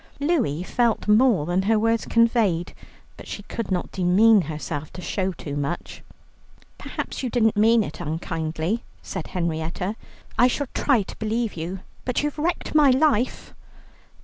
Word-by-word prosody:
Louie 275 Hz, -, 0 dB
felt 235 Hz, +2 st, 0 dB
more 210 Hz, -, +4 dB
than 175 Hz, +3 st, +1 dB
her 215 Hz, +3 st, +2 dB
words 225 Hz, +1 st, +1 dB
conveyed, 225 Hz, -7 st, +2 dB, 0.4 s
but -, -, -11 dB
she 205 Hz, -, -6 dB
could 225 Hz, +1 st, -5 dB
not 180 Hz, -2 st, -2 dB
demean 200 Hz, +4 st, +5 dB
herself 150 Hz, -1 st, -5 dB
to -, -, -8 dB
show 190 Hz, +1 st, -2 dB
too 145 Hz, -5 st, -7 dB
much. 145 Hz, +4 st, -4 dB, 0.8 s
"Perhaps -, -, -5 dB
you 255 Hz, -, -2 dB
didn't 225 Hz, -2 st, +2 dB
mean 225 Hz, +2 st, +4 dB
it 150 Hz, -, -7 dB
unkindly," 160 Hz, +5 st, -2 dB, 0.2 s
said 190 Hz, -4 st, -5 dB
Henrietta; 170 Hz, +3 st, -2 dB, 0.4 s
"I 245 Hz, -, +7 dB
shall 270 Hz, +1 st, -2 dB
try 255 Hz, -8 st, +2 dB
to -, -, -10 dB
believe 225 Hz, +1 st, -1 dB
you, 175 Hz, +3 st, -5 dB, 0.2 s
but 250 Hz, +2 st, -1 dB
you've 295 Hz, +1 st, -2 dB
wrecked 335 Hz, +3 st, -1 dB
my 300 Hz, -2 st, +6 dB
life." 255 Hz, -3 st, +1 dB
210 Hz, 150 wpm, -24 LUFS, 170-235 Hz, 0.8 s, I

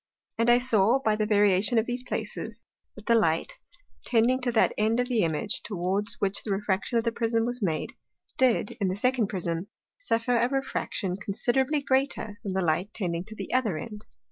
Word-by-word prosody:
And 230 Hz, +1 st, +3 dB
I 240 Hz, -, +7 dB
saw 235 Hz, -1 st, +3 dB
by 220 Hz, -5 st, +1 dB
the 215 Hz, 0 st, -1 dB
Variation 205 Hz, +1 st, +4 dB
of 225 Hz, -, +3 dB
those 245 Hz, +1 st, -3 dB
places, 255 Hz, -, -5 dB, 0.3 s
that 215 Hz, -, -12 dB
the 235 Hz, -, +3 dB
Light, 225 Hz, -, +1 dB, 0.4 s
tending 245 Hz, +2 st, +2 dB
to 250 Hz, -1 st, 0 dB
that 225 Hz, -, +3 dB
end 220 Hz, +3 st, +1 dB
of 245 Hz, -, +1 dB
the 240 Hz, -4 st, +1 dB
Image, 160 Hz, +4 st, -1 dB
towards 200 Hz, +1 st, -2 dB
which 200 Hz, -1 st, 0 dB
the -, -, -7 dB
Refraction 195 Hz, +2 st, 0 dB
of 230 Hz, -, +1 dB
the 230 Hz, -, 0 dB
first -, -, -15 dB
Prism 230 Hz, -1 st, +1 dB
was 245 Hz, 0 st, -2 dB
made, 160 Hz, -6 st, -1 dB, 0.4 s
did, 250 Hz, -5 st, +2 dB
in 195 Hz, -, +2 dB
the 185 Hz, -, -1 dB
second 250 Hz, +1 st, +1 dB
Prism, 175 Hz, -2 st, -3 dB, 0.3 s
suffer 240 Hz, -, 0 dB
a 240 Hz, +2 st, +2 dB
Refraction 230 Hz, -8 st, -2 dB
considerably 255 Hz, +8 st, 0 dB
greater 265 Hz, -6 st, 0 dB
than 195 Hz, -, -3 dB
the 190 Hz, -1 st, 0 dB
Light 170 Hz, +6 st, 0 dB
tending 175 Hz, -5 st, -2 dB
to 220 Hz, -, -9 dB
the -, -, -6 dB
other 230 Hz, -10 st, +1 dB
end. 210 Hz, +2 st, -7 dB
220 Hz, 195 wpm, -27 LUFS, 195-245 Hz, 0.4 s, I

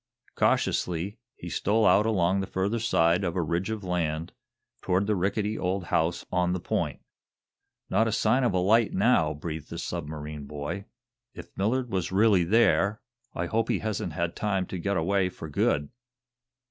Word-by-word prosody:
Cautiously 90 Hz, +4 st, 0 dB, 0.2 s
he 85 Hz, -, -9 dB
stole 105 Hz, +6 st, +1 dB
out 100 Hz, +4 st, +5 dB
along 95 Hz, -3 st, +2 dB
the 95 Hz, -, -3 dB
further 100 Hz, +5 st, -1 dB
side 85 Hz, -4 st, +2 dB
of 85 Hz, -1 st, -2 dB
a 90 Hz, -, +1 dB
ridge 85 Hz, +5 st, -1 dB
of 110 Hz, -2 st, -4 dB
land, 85 Hz, -3 st, -2 dB, 0.5 s
toward 95 Hz, +2 st, +1 dB
the 105 Hz, 0 st, +1 dB
rickety 100 Hz, +3 st, -1 dB
old 95 Hz, +1 st, -1 dB
house 80 Hz, +2 st, +1 dB
on 90 Hz, 0 st, +1 dB
the 90 Hz, -, -2 dB
point. -, -, -2 dB, 0.9 s
"Not 110 Hz, -, +2 dB
a -, -, 0 dB
sign 110 Hz, +4 st, +2 dB
of 120 Hz, -, +2 dB
a 95 Hz, -, 0 dB
light, 105 Hz, +5 st, +3 dB
now," 95 Hz, -8 st, +3 dB
breathed 80 Hz, 0 st, -6 dB
the -, -, -6 dB
submarine 75 Hz, -1 st, -5 dB
boy. 75 Hz, +7 st, -5 dB, 0.5 s
"If -, -, -11 dB
Millard 120 Hz, +5 st, 0 dB
was 95 Hz, -2 st, -1 dB
really 100 Hz, -2 st, +4 dB
there, 105 Hz, +1 st, +3 dB, 0.4 s
I 85 Hz, -, -1 dB
hope 110 Hz, +5 st, 0 dB
he -, -, +2 dB
hasn't 105 Hz, -6 st, -3 dB
had 85 Hz, +1 st, -2 dB
time 95 Hz, -3 st, -1 dB
to 90 Hz, -, -3 dB
get 100 Hz, +2 st, -1 dB
away 95 Hz, +3 st, +1 dB
for 80 Hz, -, -9 dB
good." 75 Hz, -1 st, 0 dB
95 Hz, 170 wpm, -27 LUFS, 85-105 Hz, 0.9 s, out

